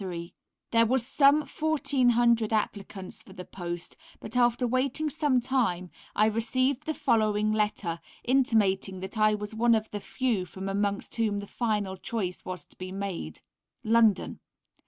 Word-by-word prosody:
There 230 0 +4
were 255 +3 +3
some 275 +4 +4
1400 245 -8 +2
applicants 200 -3 -3
for 190 - -14
the 180 -1 -8
post, 175 -2 -6 0.2
but 220 - -9
after 245 0 +3
waiting 265 +5 0
some 290 -4 +2
time 230 -9 0 0.2
I 215 - +4
received 255 +6 0
the 315 - -1
following 215 -1 +2
letter 210 -5 -1 0.2
intimating 210 -7 +2
that 190 +4 -5
I 215 0 +4
was 210 +1 -5
one 230 +1 +4
of 220 0 -2
the 205 - -3
few 225 -8 -1
from 190 +3 -7
amongst 200 +1 -1
whom 215 -3 +1
the 200 - -4
final 210 -4 -2
choice 185 -3 -3
was 185 -1 -5
to - - -20
be 185 0 -7
made: 190 - -5 0.4
London. 220 -3 +3
220 Hz, 150 wpm, -28 LUFS, 195-245 Hz, 0.4 s, There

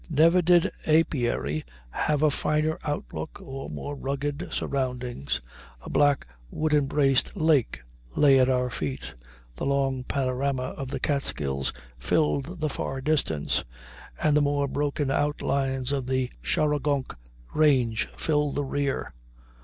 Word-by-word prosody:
Never 165 +4 +5
did 175 0 +4 0.2
apiary 120 - +1 0.3
have 150 - 0
a 155 - +5
finer 155 +2 0
outlook 80 - -4
or 135 0 -7
more 145 - -5
rugged 140 +3 -3
surroundings. 125 - -2 0.4
A - - -8
black, 145 -2 +3 0.2
wood 155 - -1
embraced 140 0 +2
lake 155 -7 +2 0.3
lay 140 -2 +6
at 130 0 +4
our 125 -1 +1
feet; 70 - -4 0.4
the - - -3
long 135 -2 +1
panorama 130 0 -1
of 135 - -5
the 130 - -4
Catskills 70 - -1 0.3
filled 155 - 0
the 155 - +2
far 135 -1 -3
distance, 130 - 0 0.6
and 150 -1 +3
the 150 - +5
more 145 0 +1
broken 145 0 -1
outlines 135 -2 0
of 135 -3 -1
the 130 -1 0
Shawangunk 145 -2 0 0.4
range 130 -7 +3
filled 150 -2 +1
the 145 0 0
rear. 140 0 -2
140 Hz, 130 wpm, -26 LUFS, 130-150 Hz, 0.6 s, lay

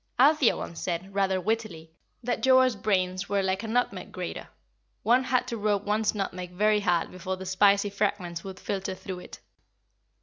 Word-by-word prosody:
Althea 285 0 +5
once 170 - -6
said, 180 +2 -3
rather 190 -1 +1
wittily, 185 -6 -3 0.3
that 245 0 -1
Joa's 260 -2 +5
brains 185 -2 0
were 200 -1 +1
like 190 0 0
a 225 - -5
nutmeg 245 +3 -1
grater - - -5 0.6
one 250 +3 +4
had 255 -1 +1
to 235 - -3
rub 205 -1 0
one's 210 +1 +1
nutmeg 185 -3 -4
very 210 +3 +3
hard 180 -5 +1
before 185 +1 -4
the 190 - -8
spicy 200 +2 +3
fragments 195 -4 -2
would 190 -1 -8
filter 195 -1 -3
through 185 -1 -7
it. - - -11
200 Hz, 170 wpm, -27 LUFS, 185-220 Hz, 0.6 s, Althea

